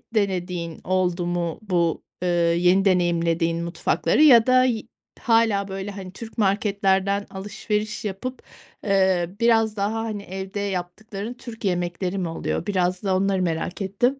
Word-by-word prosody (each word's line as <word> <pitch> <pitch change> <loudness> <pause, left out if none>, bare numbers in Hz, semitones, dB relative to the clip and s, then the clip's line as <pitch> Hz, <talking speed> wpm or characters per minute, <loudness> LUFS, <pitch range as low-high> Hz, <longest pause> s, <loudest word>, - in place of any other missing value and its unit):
denediğin 180 -5 -1
oldu 180 -1 0
mu? 175 -2 -2
Bu, 175 -5 0 0.2
ııı, 180 - +1 0.3
yeni 180 +3 +3
deneyimlediğin 170 -2 +1
mutfakları 170 - +1
ya 240 -6 +7
da 255 0 +5
y 235 -4 0 0.4
hâlâ 225 -4 +2
böyle, 195 +1 -5
hani, 190 -2 -8
Türk 225 +2 -10
marketlerden 200 -1 +1
alışveriş 210 +2 -3
yapıp, 250 +6 -5 0.4
ııı, 190 -2 +2
biraz 225 -2 +3
daha, 205 +2 -1
hani, 210 -3 -4
evde 190 +2 -6
yaptıkların 200 +3 -4
Türk 235 -3 -9
yemekleri 180 +1 -1
mi 180 -3 -1
oluyor? 165 - -3
Biraz 185 -2 0
da 190 -2 +1
onları 190 0 +1
merak 170 +2 -2
ettim. 240 +8 0
195 Hz, 140 wpm, -23 LUFS, 180-210 Hz, 0.4 s, ya